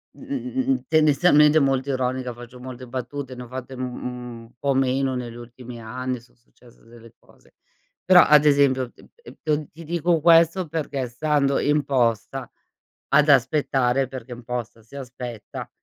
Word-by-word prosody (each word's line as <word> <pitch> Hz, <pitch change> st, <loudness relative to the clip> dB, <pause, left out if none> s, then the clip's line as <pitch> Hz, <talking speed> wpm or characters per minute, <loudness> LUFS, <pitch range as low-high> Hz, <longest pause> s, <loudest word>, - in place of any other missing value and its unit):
mh-mh, 265 Hz, -2 st, -5 dB
mh-mh, 265 Hz, 0 st, 0 dB
tendenzialmente 150 Hz, 0 st, +5 dB
molto 135 Hz, -1 st, +1 dB
ironica, 130 Hz, -1 st, -2 dB
faccio 120 Hz, +1 st, -12 dB
molte 130 Hz, 0 st, -9 dB
battute, 130 Hz, +1 st, -6 dB
ne 125 Hz, -, -8 dB
ho -, -, -11 dB
fatte 130 Hz, +1 st, -7 dB
u 130 Hz, -, -9 dB
un 125 Hz, -2 st, -7 dB
po' 140 Hz, +2 st, 0 dB
meno 135 Hz, 0 st, +1 dB
negli 120 Hz, -2 st, -5 dB
ultimi 120 Hz, 0 st, -10 dB
anni, 125 Hz, +2 st, -4 dB
son 120 Hz, -, -25 dB
successe 120 Hz, 0 st, -23 dB
delle 115 Hz, -1 st, -16 dB
cose. -, -, -25 dB, 0.5 s
Però, 180 Hz, -1 st, +8 dB
ad 150 Hz, 0 st, +5 dB
esempio, 135 Hz, -4 st, +3 dB
ehm, -, -, -18 dB, 0.2 s
ehm, 150 Hz, -, -3 dB
t -, -, -39 dB
ti 165 Hz, +2 st, -12 dB
dico 170 Hz, 0 st, 0 dB
questo 165 Hz, +2 st, +4 dB
perché, 145 Hz, -4 st, -3 dB
stando 140 Hz, +2 st, +1 dB
in 145 Hz, 0 st, +1 dB
posta 120 Hz, -6 st, -1 dB, 0.6 s
ad 150 Hz, +2 st, +4 dB
aspettare, 135 Hz, -1 st, +2 dB
perché 130 Hz, -1 st, -9 dB
in 120 Hz, -1 st, -9 dB
posta 120 Hz, -2 st, -5 dB
si 110 Hz, +6 st, -19 dB
aspetta, 125 Hz, -4 st, -8 dB
130 Hz, 160 wpm, -23 LUFS, 125-150 Hz, 0.6 s, Però